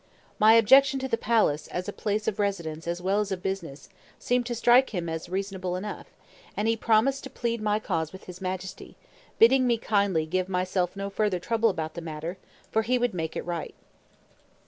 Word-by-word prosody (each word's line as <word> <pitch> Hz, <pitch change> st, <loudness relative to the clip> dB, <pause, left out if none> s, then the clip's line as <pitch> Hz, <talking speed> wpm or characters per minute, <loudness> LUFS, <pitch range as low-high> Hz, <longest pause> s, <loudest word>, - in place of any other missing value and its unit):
My 215 Hz, +1 st, +7 dB
objection 270 Hz, +5 st, +6 dB
to 265 Hz, -, -2 dB
the 255 Hz, -, +1 dB
palace, 210 Hz, -11 st, +1 dB
as 180 Hz, +2 st, -4 dB
a 205 Hz, -, -4 dB
place 210 Hz, 0 st, -2 dB
of 215 Hz, -2 st, -1 dB
residence 170 Hz, -6 st, -2 dB
as 175 Hz, +1 st, -3 dB
well 195 Hz, +2 st, +2 dB
as 205 Hz, -1 st, -2 dB
of 185 Hz, -1 st, -4 dB
business, 170 Hz, -8 st, -5 dB, 0.3 s
seemed 245 Hz, -1 st, 0 dB
to 240 Hz, -, -2 dB
strike 240 Hz, +3 st, +5 dB
him 170 Hz, -1 st, -2 dB
as 160 Hz, +1 st, -5 dB
reasonable 190 Hz, -1 st, -3 dB
enough; 205 Hz, +3 st, -6 dB, 0.5 s
and 210 Hz, -, 0 dB
he 225 Hz, -, +3 dB
promised 230 Hz, +5 st, +2 dB
to -, -, -7 dB
plead 235 Hz, -3 st, -3 dB
my 210 Hz, -1 st, +1 dB
cause 165 Hz, -7 st, -2 dB
with 190 Hz, -, -11 dB
his 180 Hz, +1 st, -11 dB
Majesty, 185 Hz, 0 st, -5 dB, 0.4 s
bidding 255 Hz, +3 st, +5 dB
me 235 Hz, -1 st, +3 dB
kindly 200 Hz, -7 st, +1 dB
"give 185 Hz, +3 st, -1 dB
myself 185 Hz, 0 st, -1 dB
no 200 Hz, 0 st, -4 dB
further 205 Hz, -2 st, 0 dB
trouble 225 Hz, +5 st, +1 dB
about 160 Hz, -5 st, -3 dB
the 170 Hz, -, -6 dB
matter, 165 Hz, +3 st, -6 dB, 0.3 s
for 220 Hz, -, +2 dB
he 245 Hz, +3 st, +1 dB
would 245 Hz, -1 st, 0 dB
make 160 Hz, -2 st, -4 dB
it -, -, -4 dB
right." 170 Hz, -2 st, -4 dB
195 Hz, 200 wpm, -27 LUFS, 180-225 Hz, 0.5 s, My